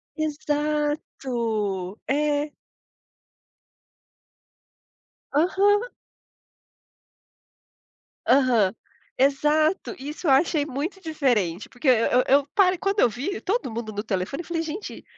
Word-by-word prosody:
Exato, 300 -1 -1 1.1
é. 295 +1 0 2.8
Aham. 400 - +3 2.4
Aham. 245 -7 +4 0.4
Exato, 300 +7 +2
isso 300 +4 -6
eu - - +5
achei 290 +1 +3
muito 310 +8 -4
diferente, 240 - 0
porque 260 +3 -1
eu 250 +1 +4
eu 280 +1 +4
parei 370 -2 +4
Quando 395 +3 0
eu 245 - +5
vi 280 - -4
todo 415 - -1
mundo 225 -1 -5
no 205 0 -3
telefone 200 - -2
eu - - -17
falei: 335 -1 -1
"Gente, 330 +6 -6
295 Hz, 95 wpm, -24 LUFS, 255-330 Hz, 2.8 s, eu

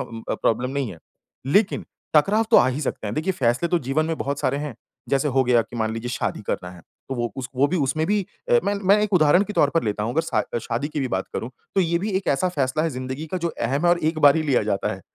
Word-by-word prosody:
अ, 115 -1 -5
problem 125 +3 0
नहीं 135 -5 -2
है। 85 - -13 0.5
लेकिन 200 +8 +2 0.3
टकराव 205 +9 +4
तो 230 - +7
आ - - +6
ही 135 +4 -2
सकते 120 -6 -3
हैं। 105 - -3
देखिए 165 +5 0
फैसले 130 +2 +1
तो 175 - +2
जीवन 145 +4 0
में 165 -1 -2
बहुत 140 0 -2
सारे 140 - 0
हैं। 145 -5 -5 0.3
जैसे 140 +2 +1
हो 135 0 +3
गया 120 -1 +4
कि 120 - -11
मान 110 -1 -1
लीजिए 115 +2 -4
शादी 125 - -2
करना 90 0 -3
है। 90 -1 -13 0.3
तो 135 - -3
वो 120 -3 -2
उस 130 -1 -5
वो 140 +2 +4
भी 180 - -1
उसमे 155 +2 0
भी 210 0 +2 0.3
अ, 485 - +6
मैं 205 - +1
मैं 205 +1 +7
एक 210 -1 -1
उदाहरण 175 +2 +5
के 210 - -6
तौर 145 -8 +3
पर 165 - +3
लेता 105 0 -1
हुँ। 115 +3 -2
अगर 160 - +3
शा 110 - 0 0.2
शादी 120 +5 -3
की 150 -1 -3
भी 130 - -1
बात 95 -2 -1
करूँ 115 - -3 0.2
तो 195 - +4
ये 170 -1 +1
भी 205 +4 -3
एक 190 - -3
ऐसा 180 +7 +2
फ़ैसला 145 -2 0
हैं 165 - 0
ज़िंदगी 130 +4 -5
का 185 - 0
जो - - +1
अहम 135 +1 -2
हैं - - +5
और 175 - +3
एक 160 -1 -2
बार 145 +1 +6
ही 160 - +1
लिया 135 -7 +2
जाता 100 -2 -1
हैं। 95 - -11
140 Hz, 280 wpm, -23 LUFS, 120-165 Hz, 0.5 s, तो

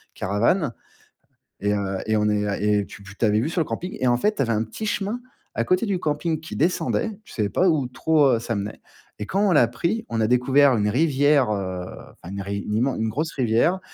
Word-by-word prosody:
caravane. 115 - +1 0.9
Et 105 +1 +1
heu 100 -1 -2
et 110 - +1
on 105 0 +2
est 105 -1 -1
et 105 0 +3
heu, - - -8
tu - - -12
tu 100 +3 -4
avais 105 0 +3
vue 150 - -1
sur 165 - -1
le - - +2
camping 180 +2 -5
et 130 - +1
en 120 - +4
fait, 210 - 0
tu - - +1
avais 115 - 0
un 110 0 +1
petit 165 - -6
chemin, 210 +3 -2 0.3
à 115 - 0
côté 185 - +1
du 195 -3 0
camping, 155 +1 -1
qui 160 - -8
descendait. 180 +6 0
Je - - -15
savais 105 -2 0
pas 185 - +2
où 145 -6 +1
trop, 150 +3 +2
heu, - - -1
ça 115 -1 -3
menait. 100 +1 -5 0.4
Et 105 - -3
quand 195 - -1
on - - +3
l'a 145 -7 +5
pris, 215 - -2
on 115 -1 -1
a 110 - +2
découvert 130 +1 +4
une 105 0 +1
rivière, 145 -1 +3
heu, 95 -3 -3 0.3
enfin, 90 - -11
une 100 - -4
riv 100 +1 -4
une 105 - -2
immen 130 +3 +1
une 110 - 0
grosse 155 +7 -2
rivière 130 +9 +2
125 Hz, 240 wpm, -23 LUFS, 105-160 Hz, 0.9 s, l'a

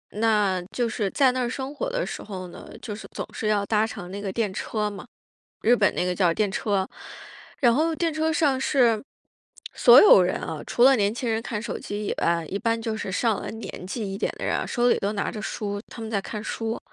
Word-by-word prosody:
那 210 -4 +2
就 240 -2 0
是 210 -4 -1
在 265 +2 +3
那 255 0 -2
儿 240 - -1
生 265 +2 -5
活 - - -2
的 - - -1
时 - - -6
候 185 -3 -7
呢， 175 - -12
就 210 -4 -5
是 220 - -10
总 - - -4
是 220 - -3
要 205 -1 +2
搭 215 0 +2
乘 180 -4 -8
那 200 +1 -5
个 195 -2 -3
电 210 -3 -1
车 210 +1 -2
嘛， 205 - -9 0.6
日 240 +2 +5
本 205 -3 +2
那 - - 0
个 180 - 0
叫 175 -2 +3
电 210 -2 +1
车。 195 -1 -1 0.7
然 240 -3 +5
后 320 +3 +1
电 330 0 0
车 315 +1 0
上 280 -4 +2
是 240 -6 +3 0.7
所 245 +2 +8
有 300 - +8
人 180 - 0
啊， 155 - -5
除 240 - 0
了 270 0 +7
年 205 0 +1
轻 240 0 -3
人 220 0 0
看 220 -4 -4
手 - - -4
机 205 0 -5
以 - - -1
外， 170 -1 +1
一 200 - -3
般 230 +1 0
就 225 -1 -2
是 195 - -4
上 220 +1 +1
了 - - -5
年 220 -4 -8
纪 200 0 -4
一 195 - -5
点 - - 0
的 - - -5
人， - - -1
手 245 0 +2
里 - - +3
都 200 +2 -1
拿 200 - -2
着 215 - -6
书， 205 -1 -4
他 230 - -9
们 220 - -5
在 200 -3 0
看 210 +1 -6
书。 225 0 -3
220 Hz, 260 characters per minute, -25 LUFS, 200-245 Hz, 0.7 s, 所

